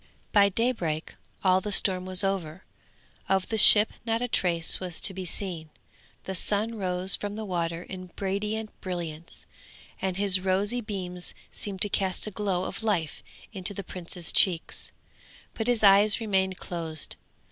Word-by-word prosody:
By 200 -1 +5
daybreak 185 -8 -2 0.3
all 185 -1 +3
the 210 - -5
storm 185 -2 +3
was 185 +1 +2
over, 190 -3 -3 0.7
of 190 -1 +1
the 220 - -1
ship 210 +1 +9
not 225 -1 -1
a 245 - -1
trace 170 -7 +2
was 180 -3 -4
to 195 - 0
be 190 0 -6
seen; 170 -3 -4 0.5
the 190 - -5
sun 210 +4 0
rose 185 -2 +2
from 205 0 -5
the 220 0 -5
water 170 -2 -3
in 185 -1 -9
radiant 210 +3 -3
brilliance, 170 -3 -6 0.6
and 190 -1 -2
his 195 -2 +2
rosy 195 +6 0
beams 180 -4 -6 0.2
seemed 195 -3 -2
to 205 - -1
cast 190 -2 -1
a 215 - -5
glow 195 -3 -2
of - - -6
life 185 -9 -2 0.3
into 195 0 -1
the 200 - -5
prince's 175 -1 -4
cheeks, 175 -4 +2 0.6
but 225 - -3
his 240 -3 +1
eyes 200 +1 +6
remained 190 -4 0
closed. 160 -3 -4
190 Hz, 160 wpm, -27 LUFS, 180-205 Hz, 0.7 s, ship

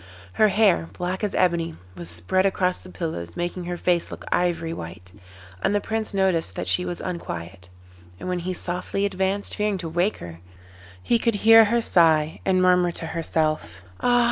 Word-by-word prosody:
Her 215 - +4
hair, 200 -5 +3
black 180 +3 -4
as 205 - -1
ebony, 170 -2 +1 0.2
was 85 -2 -7
spread 90 - 0
across 185 -2 +1
the 185 - -13
pillows, 120 - -5
making 175 +1 -3
her 175 0 -4
face 175 -1 0
look - - -9
ivory 170 -2 0
white, 85 - -9 0.5
and 205 - +1
the - - +3
Prince 220 +1 -3
noticed 185 - 0
that 90 - -3
she 180 - +3
was 175 - -4
unquiet; 90 - -6 0.5
and - - -7
when 180 -1 -1
he 180 +2 -3
softly 180 +3 -2
advanced, 195 +1 -1
fearing 210 -2 0
to 175 -2 -5
wake 175 +6 0
her, 85 -1 -9 0.6
he 235 - +2
could 230 -1 +1
hear 225 0 +9
her 235 +3 +1
sigh, 160 -6 +3
and 185 -1 +3
murmur 180 -1 +4
to 165 - -4
herself: 155 - -1 0.2
'Ah! 245 0 +3
180 Hz, 180 wpm, -24 LUFS, 160-195 Hz, 0.6 s, hear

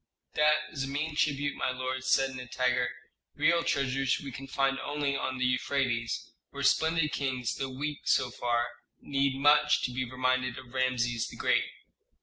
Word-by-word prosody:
"That 150 0 +5 0.2
is 135 -2 -3
a - - -6
mean 150 +3 -2
tribute, 145 -1 +1
my - - -1
lord," 130 0 -3
said 135 +1 +3
Nitager. 125 0 0 0.5
"Real 170 0 +3
treasures 135 -1 +1
we 140 - -7
can 135 +2 -8
find 135 0 +1
only 145 -1 -1
on 130 -1 -2
the 130 - 0
Euphrates, 125 -2 0 0.2
where 140 0 -6
splendid 160 +2 +3
kings, 130 -4 -1
though 135 - -2
weak 145 +3 -4
so 125 -1 +3
far, 120 0 0 0.3
need 140 -1 0
much 150 +1 +5
to 125 - 0
be 130 +1 -1
reminded 130 0 0
of 130 -2 -11
Rameses 120 -3 0
the - - -10
Great." - - +2
135 Hz, 165 wpm, -29 LUFS, 125-140 Hz, 0.5 s, That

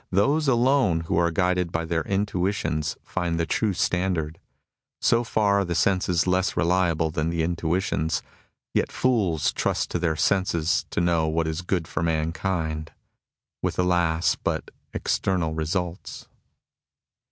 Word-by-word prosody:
Those 140 +11 +2
alone 125 -8 +3
who 80 - -2
are 85 0 +3
guided 90 0 0
by 85 -1 -1
their 80 0 0
intuitions 90 -6 -1
find 85 -2 -2
the 85 - +1
true 110 +5 0
standard. 90 -3 -1 0.6
So 115 +1 +3
far 105 -3 +2
are - - +2
the 85 -2 -3
senses 90 -2 +2
less 90 +1 +1
reliable 85 -2 +2
than 80 -1 -1
the 85 -1 0
intuitions. 85 -1 -1 0.5
Yet - - 0
fools 100 - +1
trust - - -1
to 85 - -1
their 85 -2 0
senses 85 0 +1
to - - -1
know 85 -2 +2
what 80 +1 0
is 80 +2 -2
good 90 -2 -1
for 75 - -3
mankind, 80 0 -1 0.7
with - - -2
alas! 85 -2 +2
but - - -3 0.2
external 90 -5 0
results. 85 +3 -3
85 Hz, 140 wpm, -25 LUFS, 80-95 Hz, 0.7 s, alone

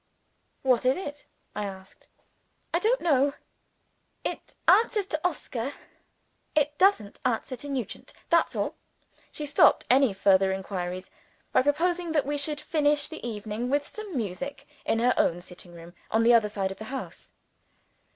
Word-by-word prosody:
"What 255 -3 +3
is 255 +1 +3
it?" 290 -6 -7 0.3
I 210 - -2
asked. 190 -1 -10 0.7
"I - - +3
don't 480 +3 +2
know. 285 -4 +3 0.9
It - - -5
answers 435 -3 +5
to 310 -4 -3
Oscar. 280 -7 -2 0.8
It 295 -1 +2
doesn't 370 - +3
answer 255 +2 -1
to 285 +4 -8
Nugent 260 -6 -5 0.2
that's 335 -1 +3
all." - - -1 0.6
She 300 - -4
stopped 290 0 +5
any 265 -2 +5
further 195 0 +4
inquiries 185 -1 -4 0.4
by - - +4
proposing 335 +4 +1
that 295 -3 +2
we 290 +1 -1
should 295 +1 -1
finish 295 -1 +1
the 320 - -9
evening 220 +1 -4
with 285 +1 +1
some 420 -8 -7
music, 270 +7 -4 0.2
in - - +2
her 245 +2 +3
own 170 - +2
sitting 180 0 -12
room, 170 +1 -12 0.2
on 225 +1 +2
the 240 +1 +6
other 225 -3 +4
side 195 -2 -2
of 190 - -8
the 220 - -6
house. 265 +2 -7
260 Hz, 155 wpm, -27 LUFS, 210-295 Hz, 0.9 s, the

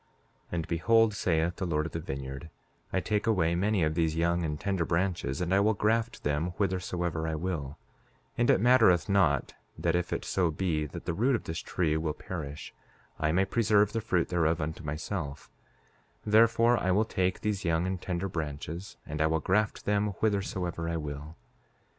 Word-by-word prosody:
5:8 - - -38 0.5
And 85 -2 -2
behold, 110 +6 +3
saith 85 -3 0
the 95 - -2
Lord 75 -2 0
of 80 - -5
the 80 - -3
vineyard, 70 +1 -6 0.4
I 95 - +1
take 105 +3 -1
away 90 -7 +2
many 95 +1 +1
of 80 0 +1
these 80 -1 +1
young 85 +1 +1
and 75 -2 -2
tender 95 -4 0
branches, 85 -5 -1
and 90 +1 0
I 95 - +5
will 105 +2 +3
graft 110 +2 0
them 75 +4 -1
whithersoever 90 -4 -1
I 80 - -1
will; 80 -4 -3 0.6
and 120 - +1
it - - +5
mattereth 115 -7 +5
not 90 -9 +2 0.2
that 85 - 0
if 90 0 -1
it - - -2
so 90 -3 +1
be 80 -2 -1
that - - -9
the 85 - -1
root 120 +9 +2
of - - -3
this 80 0 -4
tree 80 -2 0
will 80 -1 -2
perish, 75 -5 -7 0.5
I 80 0 +1
may 95 +4 +3
preserve 105 -2 +2
the 115 - -1
fruit 90 -6 0
thereof 80 -2 +1
unto 80 +2 -4
myself; 75 0 -5 0.7
wherefore, 115 +2 +4
I 95 - -1
will 100 +4 +3
take 95 -3 -1
these 105 -2 -1
young 85 0 +1
and 95 -1 -2
tender 90 +1 -2
branches, 80 +2 -5
and 75 +1 -4
I 80 - +4
will 80 0 +1
graft 105 +6 0
them 105 0 +1
whithersoever 95 -4 -1
I 85 - -1
will. 75 +1 -6
85 Hz, 190 wpm, -29 LUFS, 80-100 Hz, 0.7 s, I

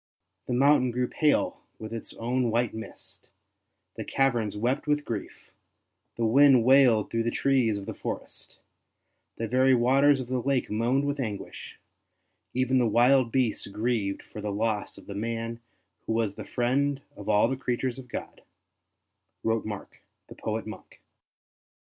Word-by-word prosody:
'' - - -54
The - - -1
mountain 135 0 +4
grew 125 +1 -1
pale 150 +2 +1 0.2
with 110 +1 -8
its 115 - -6
own 120 +1 0
white 115 0 0
mist; 110 0 -10 0.7
the - - -3
caverns 120 -7 0
wept 125 +7 -1
with 150 0 +1
grief; 110 -3 -6 0.6
the 115 - 0
wind 130 +1 +6
wailed 125 -4 +5
through 115 - 0
the 115 - 0
trees 125 -5 +1
of 100 - -7
the - - -5
forest; - - -7 0.8
the 115 - -3
very 130 +2 +4
waters 135 +4 +4
of 130 - -4
the 130 0 -1
lake 135 -2 0
moaned 120 +6 +1
with 145 0 -2
anguish; 105 -6 -6 0.8
even 130 0 +2
the 120 - +3
wild 120 +2 +4
beasts 125 -4 0
grieved 105 -1 -2
for 105 - -9
the 105 0 -3
loss 105 0 -2
of - - -13
the 100 - -7
man 115 +2 -3 0.5
who - - 0
was 110 -3 0
the - - -8
friend 135 +3 0
of 100 - -8
all 105 +1 +4
the 135 - -1
creatures 130 0 -2
of 125 -1 -11
God, - - -7 0.5
" - - -54
wrote 115 0 0
Mark 105 -2 -8 0.3
the - - -10
poet 110 0 -3
monk. 110 0 -10
120 Hz, 165 wpm, -27 LUFS, 110-130 Hz, 0.8 s, wind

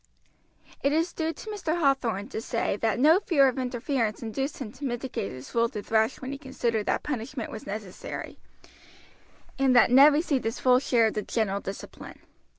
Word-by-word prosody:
It 280 - +2
is 330 +3 +1
due 320 -1 -1
to 435 - -10
Mr. 345 -5 -2
Hathorn 245 - +1
to 220 - -4
say 230 -4 -1
that 220 -1 0
no 315 +7 +6
fear 295 -9 +4
of 260 0 -1
interference 245 -3 -2
induced 270 +6 -3
him 240 -6 -6
to 290 - -13
mitigate 240 - -3
his 130 +1 -10
rule 230 0 +2
to 210 -4 -6
thrash 220 +2 +1
when 260 +1 -6
he 280 - -6
considered 235 -6 -2
that - - 0
punishment 255 -2 -4
was 215 - -8
necessary, 200 -2 -7 1.2
and 265 -2 +3
that 240 - +6
Ned 275 +4 +8
received 290 -5 0
his 225 +2 -2
full 250 -1 +5
share 240 -4 +3
of 220 - +1
the 210 - -2
general 205 -2 -1
discipline. 195 - -8
250 Hz, 185 wpm, -27 LUFS, 220-280 Hz, 1.2 s, Ned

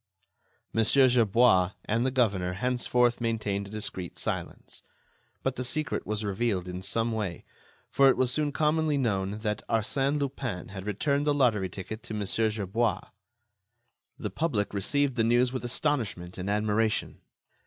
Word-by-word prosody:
Mon. 115 - +3
Gerbois 115 -7 +4
and 115 +3 +1
the 130 - +2
governor 100 -9 +1
henceforth 125 +2 +1
maintained 105 -4 -1
a - - -11
discreet 100 -4 -5
silence. - - -4 0.6
But 135 -1 -1
the 125 - -2
secret 155 +4 -2
was 105 +1 -2
revealed 100 -2 -1
in 90 0 -5
some 115 +4 0
way, 105 -6 -3 0.5
for 135 0 +6
it - - +3
was 130 -1 +2
soon 150 +2 0
commonly 155 0 +1
known 100 -5 0
that 105 -1 -2
Arsène 135 +6 +1
Lupin 130 -9 -3
had 95 0 -7
returned 140 +8 0
the 145 - +3
lottery 110 -9 +2
ticket 105 +5 -7
to 110 - -7
Mon. 105 -1 -2
Gerbois. 110 +2 0 1.1
The - - -4
public 115 -13 -1
received 135 +6 +1
the 115 - +3
news 120 +2 +3
with 130 - -3
astonishment 115 - -2
and 95 +2 -3
admiration. 105 +1 0
115 Hz, 150 wpm, -28 LUFS, 100-130 Hz, 1.1 s, for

